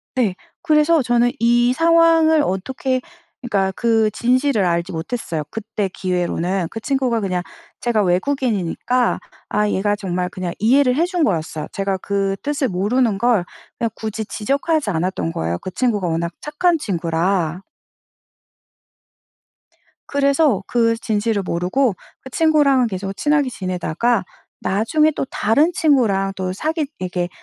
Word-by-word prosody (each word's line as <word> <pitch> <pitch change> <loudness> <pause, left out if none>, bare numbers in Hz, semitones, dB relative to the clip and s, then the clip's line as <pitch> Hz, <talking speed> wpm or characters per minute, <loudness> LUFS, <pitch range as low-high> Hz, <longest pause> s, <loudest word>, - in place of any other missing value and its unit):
네. 230 -7 +1 0.3
그래서 310 -1 +3
저는 240 0 +2
이 240 +2 +3
상황을 330 0 +4
어떻게 255 +5 -1 0.4
그니까 200 -6 0
그 225 -2 +2
진실을 250 0 +1
알지 170 +1 0
못했어요 165 -2 -3
그때 215 -2 -3
기회로는. 180 0 -1
그 225 - -5
친구가 255 -2 0
그냥 185 -4 -2 0.4
제가 235 -3 +1
외국인이니까 230 +3 0 0.3
아 210 0 +1
얘가 205 +1 +1
정말 180 -3 -3
그냥 180 -1 -5
이해를 250 +4 +3
해 330 +5 +2
준 355 -2 -1
거였어요. 160 - -1
제가 195 -1 -1
그 195 0 -1
뜻을 285 -2 -1
모르는 210 +4 +1
걸 235 -5 +3 0.3
그냥 230 - 0
굳이 220 0 -5
지적하지 280 +6 -1
않았던 175 -1 -1
거예요 85 +2 -2
그 - - -6
친구가 210 -5 0
워낙 170 +1 -1
착한 330 +3 +1
친구라. 175 - -1 2.5
그래서 280 - +2
그 230 -1 +2
진실을 215 -2 -1
모르고 185 +8 0 0.3
그 265 - -10
친구랑은 285 -4 +3
계속 195 -1 -4
친하게 295 -3 +2
지내다가 185 +2 -1 0.4
나중에 300 +11 +2
또 - - -2
다른 285 +11 +2
친구랑 225 -12 +2
또 185 -1 -3
사귀 310 - -1
이렇게 180 -1 -2
220 Hz, 295 characters per minute, -20 LUFS, 185-270 Hz, 2.5 s, 상황을